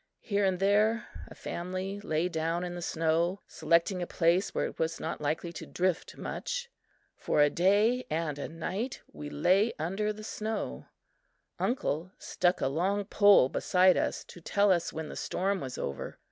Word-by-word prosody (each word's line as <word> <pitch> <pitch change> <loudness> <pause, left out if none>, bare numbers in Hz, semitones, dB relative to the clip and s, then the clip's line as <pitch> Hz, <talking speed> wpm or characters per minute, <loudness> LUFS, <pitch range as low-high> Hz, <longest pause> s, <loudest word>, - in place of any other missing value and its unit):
Here 205 -1 0
and 190 -1 +1
there, 210 +3 +3 0.2
a - - -12
family 185 +3 -4
lay 165 -3 0
down 165 0 -1
in 175 -1 -4
the 175 - -6
snow, 165 +3 0
selecting 170 +4 +1
a 175 - -2
place 175 +3 +2
where - - -1
it - - -7
was 160 0 -1
not - - -4
likely 160 +3 -2
to - - -8
drift 180 -1 -1
much. 485 -1 -4 0.4
For - - -1
a 145 0 +5
day 210 +8 +3
and 155 -2 -2
a - - -4
night 190 +9 -4
we 150 - -7
lay 190 +10 +3
under 195 +7 -1
the 215 0 -9
snow. 215 0 -4 0.7
Uncle 185 - -1
stuck 175 +1 0
a - - +2
long 190 +8 0
pole 205 -8 +6
beside 185 +6 +4
us - - -1
to 175 - -13
tell 200 +4 +3
us 175 -2 +1
when 160 -1 -5
the - - -8
storm 195 +1 -1
was 130 -2 -5
over. 70 - -5
180 Hz, 175 wpm, -30 LUFS, 165-205 Hz, 0.7 s, pole